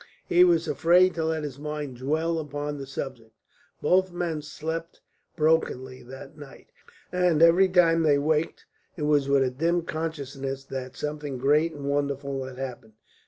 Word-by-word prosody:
He 175 +1 +5
was 170 -2 +3
afraid 180 +2 +4
to 165 -1 -2
let 160 -1 -1
his 140 -2 -6
mind 150 -3 -5
dwell 160 +5 -1
upon 145 -1 -4
the 135 - -7
subject. 125 -5 -7 0.5
Both 185 0 +3
men 170 -3 -3
slept 160 +2 -6 0.4
brokenly 150 -5 0
that 130 +4 -11
night, 145 -3 -13 0.4
and 180 -3 +2
every 170 +3 +6
time 170 -2 +4
they 150 -3 +4
waked 155 +2 -1 0.3
it 155 - -4
was 145 -2 +2
with 140 -1 +4
a 130 - 0
dim 165 +6 0
consciousness 140 -5 -4
that 130 -1 -6
something 150 -2 -4
great 150 +5 +2
and 145 -1 -8
wonderful 140 -1 -1
had 130 -1 -9
happened. 125 -4 -7
150 Hz, 160 wpm, -26 LUFS, 135-165 Hz, 0.5 s, every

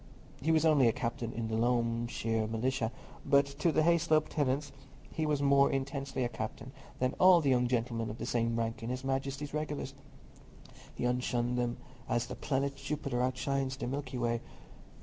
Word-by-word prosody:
He 160 +4 +2
was 160 0 +3
only 145 -6 +5
a - - +5
captain 115 -1 -3
in 115 -1 -3
the 110 - -2
Loamshire 115 -1 0
Militia, 115 +1 -1 0.3
but 140 -1 +4
to 140 +4 0
the 155 - +3
Hayslope 160 -2 +3
tenants 140 -1 0 0.4
he 160 -1 -1
was 145 -2 +1
more 140 0 +5
intensely 135 -1 -2
a - - +1
captain 110 +2 -6 0.3
than 130 0 0
all 185 -1 +8
the 140 -4 +2
young 125 -1 +3
gentlemen 115 -2 -1
of 105 - -6
the 115 - -4
same 115 -1 0
rank 115 0 -2
in 115 - -4
his 130 +1 -3
Majesty's 135 +2 -2
regulars—he 145 -4 -8
outshone 125 0 0
them 120 -1 -1 0.3
as 120 -1 +1
the - - -6
planet 140 0 -1
Jupiter 140 -3 -2
outshines 130 +1 -1
the 120 - -4
Milky 130 0 -4
Way. 120 -1 0
130 Hz, 170 wpm, -32 LUFS, 120-140 Hz, 0.4 s, all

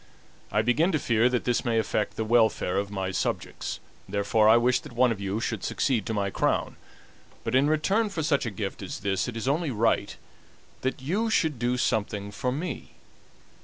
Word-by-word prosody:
I 105 - +2
begin 150 - +2
to - - +3
fear 115 -3 +2
that 125 -1 0
this 120 -1 0
may 115 -1 +1
affect 110 -2 0
the 110 - -2
welfare 110 -5 +2
of 100 0 -3
my 95 -2 -3
subjects, - - -3 0.3
therefore 105 +2 +3
I 115 - +7
wish 120 +1 +3
that - - -12
one 125 0 +3
of 105 -3 -4
you 100 +2 -2
should 115 -3 -3
succeed 120 -7 0
to 110 - -1
my 100 -1 -1
crown; - - 0 0.7
but 115 - -3
in 135 +3 +4
return 195 +8 +2
for 170 -5 -3
such 145 -5 +1
a - - 0
gift 100 -1 -5
as 95 - -6
this 95 +1 0
it 120 -2 -5
is 115 - -4
only 155 +3 +1
right 115 -2 0 0.6
that 130 0 -2
you 205 +11 0
should 160 - +1
do 125 +1 0
something 105 -3 -1
for 125 +5 -2
me. 155 +3 -5
120 Hz, 200 wpm, -27 LUFS, 105-135 Hz, 0.7 s, I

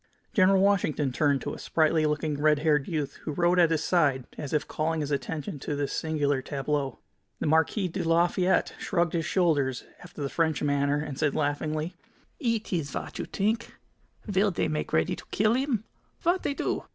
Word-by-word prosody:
General 190 -1 +5
Washington 180 -8 +2
turned 140 0 +2
to 145 - -4
a - - -8
sprightly 155 -1 +2
looking, 150 -1 -1
red 150 0 +4
haired 150 -2 +2
youth 150 -5 -3
who 155 - -4
rode 175 +3 +3
at 170 -2 +6
his 160 -2 0
side, 140 -8 +2
as 145 -3 -6
if 150 - 0
calling 160 +1 -1
his 145 0 -3
attention 145 0 -3
to 145 - -3
this 145 -1 -2
singular 145 -4 0
tableau. 140 -1 -2 0.4
The - - -2
Marquis 160 +6 +2
de 170 - -4
Lafayette 175 +3 +2
shrugged 170 -4 0
his 165 -2 0
shoulders 145 -9 +1 0.2
after 175 -4 -8
the - - 0
French 160 +1 0
manner, 145 0 +2
and 150 -2 -5
said, 150 -2 +1
laughingly: 155 +2 -1 0.5
"It 230 - -1
ees 160 -5 -1
vat - - -6
you - - -3
t'ink? 220 +4 -1 0.5
Vill 200 0 +2
they 175 - -1
make 155 -1 -3
ready 80 - +1
to - - -12
kill 215 +2 +2
'im? 260 -5 0 0.4
Vat 350 +2 +2
they 280 - -2
do?" - - -2
155 Hz, 190 wpm, -27 LUFS, 145-180 Hz, 0.5 s, at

